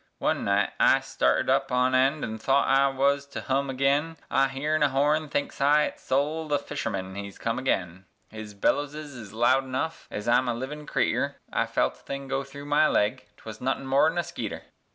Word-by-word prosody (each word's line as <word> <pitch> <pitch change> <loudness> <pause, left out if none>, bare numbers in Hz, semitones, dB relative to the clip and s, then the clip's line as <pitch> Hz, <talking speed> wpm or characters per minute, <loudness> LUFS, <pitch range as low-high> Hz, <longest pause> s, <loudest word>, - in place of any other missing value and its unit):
One - - 0
night 100 0 +2
I - - +5
started 65 0 0
up - - +1
on 125 +1 +2
eend 135 +4 +2
an 110 0 -4
thought 135 +5 +2
I 135 +1 +4
wuz 140 +1 +2
to - - -4
hum 135 +1 -1
agin, 140 +5 +1
I 135 0 +3
heern 150 +3 -1
a 145 - +4
horn, 150 +3 +1
thinks 145 - -3
I 145 +2 +5
it's - - -4
Sol 150 +4 -1
the 145 -1 +2
fisherman 95 -10 -4
hez 100 0 -7
come 115 +1 -2
agin, 95 -8 -2 0.3
His 110 -1 -9
bellowses 145 +7 -1
is 110 -4 -9
sound 130 +5 +2
enough 130 +6 -3
ez 105 +2 -6
I'm 125 +2 +3
a 120 - 0
livin' 150 +5 -6
creeter, - - 0 0.2
I - - +1
felt - - +1
a - - -23
thing 140 0 -6
go 135 +1 -1
thru 140 +1 -10
my 150 +1 +4
leg 120 +5 0
'twuz 110 -1 -10
nothin' 135 +1 -1
more 135 +4 +4
'n 165 - -5
a 175 - +1
skeeter! 170 - -6
135 Hz, 205 wpm, -26 LUFS, 120-145 Hz, 0.3 s, I